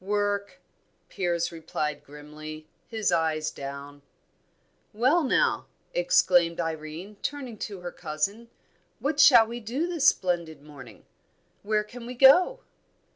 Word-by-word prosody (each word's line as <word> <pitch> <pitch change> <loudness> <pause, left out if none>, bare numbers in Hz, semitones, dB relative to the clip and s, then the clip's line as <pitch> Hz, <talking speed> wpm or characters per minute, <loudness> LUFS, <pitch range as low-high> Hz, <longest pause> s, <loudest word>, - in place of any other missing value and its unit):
"Work!" 205 0 -2 0.5
Piers 175 -2 -1
replied 155 -3 -4
grimly, 155 +1 -10 0.2
his 220 -3 -1
eyes 155 -2 0
down. 140 0 -8 0.9
"Well, 260 +10 +3
now," 265 - +1 0.3
exclaimed 180 - +3
Irene, 165 +4 -5
turning 260 -7 -5
to 200 -3 -6
her 175 0 -6
cousin, 200 +12 -3 0.5
"what 285 +1 -2
shall 245 -6 +8
we 235 +2 -6
do 240 +8 -2
this 335 -5 +1
splendid 170 - 0
morning? 145 -3 -13 0.6
Where 210 +1 0
can 235 +2 -11
we 250 - -7
go?" 355 - +6
195 Hz, 120 wpm, -26 LUFS, 155-240 Hz, 0.9 s, shall